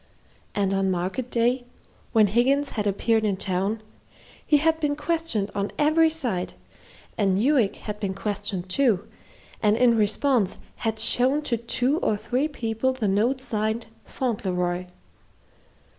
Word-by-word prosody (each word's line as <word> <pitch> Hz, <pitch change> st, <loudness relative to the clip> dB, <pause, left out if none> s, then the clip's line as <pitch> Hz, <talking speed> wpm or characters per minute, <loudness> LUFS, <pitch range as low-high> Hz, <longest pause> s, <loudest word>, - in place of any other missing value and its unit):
And 195 Hz, -1 st, +1 dB
on 195 Hz, 0 st, +1 dB
market 185 Hz, +8 st, -2 dB
day, 245 Hz, +2 st, +1 dB, 0.5 s
when 220 Hz, -2 st, +5 dB
Higgins 265 Hz, +7 st, +2 dB
had 210 Hz, -2 st, -2 dB
appeared 220 Hz, +3 st, +1 dB
in 200 Hz, -3 st, 0 dB
town, 195 Hz, +3 st, -2 dB, 0.6 s
he 295 Hz, -, +4 dB
had 320 Hz, +2 st, +2 dB
been 295 Hz, -2 st, 0 dB
questioned 295 Hz, -10 st, -1 dB
on 200 Hz, 0 st, -2 dB
every 315 Hz, +2 st, +4 dB
side, 245 Hz, -, -2 dB, 0.6 s
and 195 Hz, -3 st, +2 dB
Newick 240 Hz, -2 st, +2 dB
had 210 Hz, -1 st, -7 dB
been 195 Hz, -2 st, -3 dB
questioned 195 Hz, -2 st, -2 dB
too, 215 Hz, -1 st, +1 dB, 0.5 s
and 210 Hz, 0 st, +3 dB
in 240 Hz, -1 st, +4 dB
response 215 Hz, 0 st, +1 dB, 0.2 s
had 220 Hz, -1 st, -2 dB
shown 255 Hz, +6 st, +3 dB
to 245 Hz, -, +1 dB
two 250 Hz, +6 st, 0 dB
or 215 Hz, -, 0 dB
three 250 Hz, +7 st, -1 dB
people 240 Hz, -2 st, -1 dB
the 245 Hz, -5 st, -2 dB
note 225 Hz, +7 st, +1 dB
signed 220 Hz, -2 st, -2 dB, 0.2 s
"Fauntleroy." 180 Hz, -7 st, -2 dB
225 Hz, 140 wpm, -25 LUFS, 200-260 Hz, 0.6 s, when